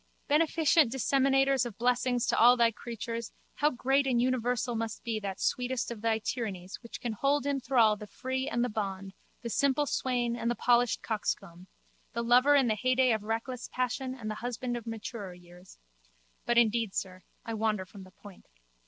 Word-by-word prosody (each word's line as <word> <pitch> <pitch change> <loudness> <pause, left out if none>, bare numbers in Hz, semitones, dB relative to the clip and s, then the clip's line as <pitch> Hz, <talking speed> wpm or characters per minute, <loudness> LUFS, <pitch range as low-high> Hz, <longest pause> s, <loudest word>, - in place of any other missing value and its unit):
Beneficent 310 -2 +3
Disseminator 270 +2 +2
of 235 -5 -6
blessings 245 0 +1
to - - +1
all 245 +2 +6
Thy 235 -1 +4
creatures, 230 0 -6 0.2
how 295 - +2
great 270 +1 +1
and 245 -3 +2
universal 245 -1 0
must 225 -1 -4
be 225 -2 -2
that 195 -2 -5
sweetest 250 -1 -1
of 225 -3 -7
Thy 225 -1 +1
tyrannies 205 -5 -5
which 235 - -9
can 240 -3 -3
hold 280 +6 +1
in 280 -1 0
thrall 235 -5 +3
the 210 0 -10
free 260 +4 -3
and 240 +1 0
the - - -2
bond, 195 -3 -4 0.3
the 235 - -3
simple 280 +3 +2
swain 245 -4 -1
and 235 0 -2
the 240 - 0
polished 245 -1 +2
coxcomb, 185 -5 -3 0.5
the 235 - -2
lover 250 +5 +5
in 275 -2 +4
the 225 - +2
heyday 255 +3 +2
of 220 -2 +1
reckless 230 +3 -4
passion 255 +1 -2
and 230 -5 -8
the 215 - -7
husband 245 +1 -3
of 235 -1 -7
maturer 215 -4 -6
years. 175 +1 -16 0.7
But 240 - +2
indeed, 225 -3 +2
sir, 185 -1 -4 0.2
I 230 - -4
wander 215 -3 -1
from 195 +1 -12
the 185 - -14
point. 200 0 -15
235 Hz, 185 wpm, -30 LUFS, 215-255 Hz, 0.7 s, all